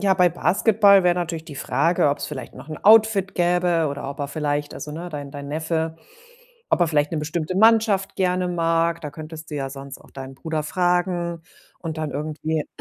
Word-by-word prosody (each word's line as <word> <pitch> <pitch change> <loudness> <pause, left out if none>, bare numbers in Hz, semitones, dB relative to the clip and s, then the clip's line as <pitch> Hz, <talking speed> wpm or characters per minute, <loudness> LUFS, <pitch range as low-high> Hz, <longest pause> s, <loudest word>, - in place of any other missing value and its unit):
Ja, 195 -1 +3
bei 180 -1 +4
Basketball 200 +3 +4
wäre 175 -1 +4
natürlich 165 -2 -3
die 150 - -10
Frage, 145 +4 +1
ob's 145 - -3
vielleicht 130 -5 -7
noch 130 +3 -12
'n 155 - -6
Outfit 215 -3 +5
gäbe, 175 -2 +2
oder 140 -1 -5
ob 140 - -9
er 140 - -2
vielleicht 145 0 -2
also, 150 - -7
ne, 170 +3 -6
dein 145 -3 -7
dein 140 -1 -8
Neffe, 160 +1 -2 0.7
ob - - +2
er 175 - +5
vielleicht 150 0 +1
'ne 160 - -1
bestimmte 155 +3 -3
Mannschaft 215 -2 +4
gerne 180 -1 +1
mag. 165 -1 +1
Da 150 - -6
könntest 155 +1 -9
du - - -5
ja 135 -2 -3
sonst 135 0 -8
auch - - -19
deinen 135 0 -9
Bruder 160 +2 -3
fragen 175 0 0 0.4
und 165 -2 -5
dann 155 -1 -3
irgendwie 155 +1 -3
165 Hz, 195 wpm, -23 LUFS, 150-180 Hz, 0.7 s, Outfit